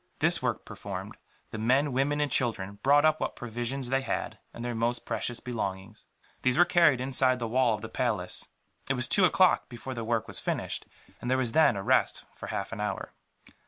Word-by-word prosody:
This - - +2
work - - -2
performed, - - -7 0.4
the 110 - -5
men, 130 +5 +2
women 140 +3 +1
and 145 - 0
children 100 -5 -1
brought 145 +2 +5
up 155 0 +3
what - - -2
provisions 120 +2 -4
they 135 +1 +1
had, 135 - -3
and 120 - -7
their 120 - -2
most 115 +1 -1
precious 115 +1 -2
belongings. 105 -3 -5 0.4
These 130 0 +2
were 175 - +7
carried 170 -7 +4
inside 130 0 +3
the 120 -2 -3
wall 120 -1 +2
of 105 - -9
the 110 - -5
palace. 110 -6 -2 0.4
It 135 - +2
was 125 -1 +3
two 195 - +6
o'clock 185 +1 +3
before 130 +1 -7
the 115 -2 -4
work 115 0 -1
was - - -3
finished, - - -3 0.3
and 125 - -4
there 130 - +3
was 125 -3 0
then 155 -4 +4
a 100 - -4
rest - - +2
for - - -8
half - - -4
an - - -6
hour. - - -4
125 Hz, 205 wpm, -28 LUFS, 115-135 Hz, 0.4 s, were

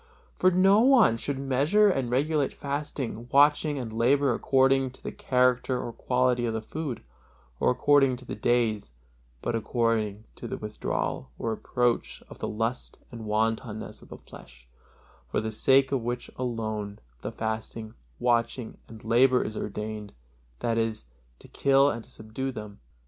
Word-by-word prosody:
For 185 - +4
no 190 +3 +5
one 245 - +5
should 140 +4 -3
measure 140 +10 +3
and 135 -11 0
regulate 145 +3 +1
fasting, 140 -4 -4
watching 145 +1 +4
and 120 -4 -5
labor 130 +4 +3
according 135 +2 +3
to - - -13
the - - -4
character 125 0 +1
or 120 - -5
quantity 125 -1 +1
of 115 - -2
the 110 - -2
food, 145 - -5 0.6
or - - +3
according 135 +1 +4
to 125 +1 -12
the - - -6
days, 115 - 0 0.5
but - - -1
according 115 -2 0
to 120 - -7
the - - -4
withdrawal 105 -10 -3
or 115 - -2
approach 120 +2 -1
of - - -12
the - - -3
lust 115 +3 -3
and 115 -2 -8
wantonness 110 +1 -2
of - - -16
the - - -9
flesh, 65 -1 -15 0.6
for - - 0
the 110 0 -3
sake 135 +5 +4
of 135 -3 0
which 120 +1 -4
alone 110 -4 -3 0.2
the - - -4
fasting, 110 0 -5 0.2
watching 120 - 0
and 110 -1 -12
labor 125 +3 +4
is 110 - -5
ordained, 105 0 -5 0.5
that 115 -1 0
is, 115 -1 -2 0.3
to - - -15
kill 140 +1 +3
and 115 -1 -6
to - - -20
subdue 110 +5 -5
them. 105 -4 -9
120 Hz, 160 wpm, -27 LUFS, 110-135 Hz, 0.6 s, no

